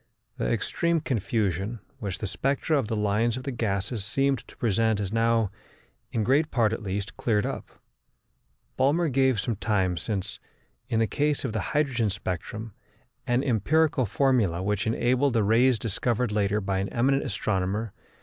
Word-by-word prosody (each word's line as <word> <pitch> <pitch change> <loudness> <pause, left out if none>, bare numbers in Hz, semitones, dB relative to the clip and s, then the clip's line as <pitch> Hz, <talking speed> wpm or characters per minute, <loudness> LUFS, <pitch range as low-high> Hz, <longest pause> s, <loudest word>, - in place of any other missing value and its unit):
The - - -1
extreme 170 - 0
confusion 110 - -1 0.2
which 100 -3 -3
the - - -5
spectra 135 - 0
of 135 -7 +1
the 115 - -1
lines 105 +3 +1
of 130 - -6
the 135 - -3
gases 100 -2 -2
seemed 135 +5 +1
to - - -16
present 110 -1 +1
is 100 0 -3
now, 115 -2 +2 0.6
in 110 - 0
great 140 +7 +3
part 110 -3 +2
at 115 - -3
least, 100 0 -4
cleared 105 -3 +1
up. - - -4 1.1
Balmer 150 +5 +3
gave 130 -3 +2
some 115 +3 -1
time 95 -4 0
since, 95 +3 -3 0.5
in 115 - +1
the 115 - +3
case 145 +4 0
of 120 - -2
the 110 - -1 0.2
hydrogen 125 -7 +1
spectrum, 100 +3 -5 0.5
an 120 +1 +2
empirical 140 +2 +2
formula 105 -9 +2
which 105 +1 0
enabled 125 +4 +2
the 115 -3 +3
rays 115 +4 +4
discovered 115 +2 -1
later 105 0 +1
by 95 -1 -1
an 95 - -2
eminent 135 +3 +2
astronomer, 100 -2 -1
M. - - -36
115 Hz, 165 wpm, -27 LUFS, 100-130 Hz, 1.1 s, rays